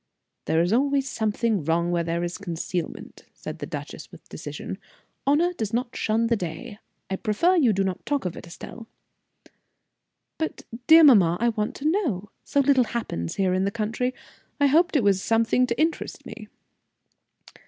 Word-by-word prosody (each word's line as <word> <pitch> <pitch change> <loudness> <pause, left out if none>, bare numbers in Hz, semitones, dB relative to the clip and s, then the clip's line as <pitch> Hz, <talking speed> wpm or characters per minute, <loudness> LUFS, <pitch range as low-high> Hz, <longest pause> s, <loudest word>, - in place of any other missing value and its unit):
"There 160 +1 +2
is 175 +4 0
always 275 +2 +2
some 220 -5 -1 0.3
wrong 170 +2 +1
where 170 -1 +1
there 170 +1 -2
is 175 +2 -4
concealment," 175 -2 -5
said - - -8
the - - -5
duchess, - - -7
with - - -15
decision. - - -7 0.5
"Honor 330 +6 +3
does 220 - -4
not 245 0 -2
shun 225 +1 +1
the 230 0 +2
day. 205 +4 -6 0.3
I 190 - -1
prefer 335 - +2
you 275 -10 +4
do 195 -1 +1
not 190 -2 -3
talk 285 -6 -1
of 180 - -3
it, - - -10
Estelle." 225 +6 -10 1.5
"But, 320 - -3 0.2
dear 320 +1 +9
mamma, 190 - +6
I 235 +1 +2
want 215 -2 -2
to 280 - -8
know. 270 - -1
So 280 - +1
little 270 -2 +4
happens 85 - -4
here 190 -2 +1
in 185 +1 +1
the 200 - +1
country, 230 +4 -2 0.5
I 285 - +4
hoped 330 +5 +3
it 275 - +3
was 195 -2 +3
something 230 +3 +2
to 235 +1 -2
interest 320 +1 -1
me." - - -9
225 Hz, 175 wpm, -25 LUFS, 185-275 Hz, 1.5 s, dear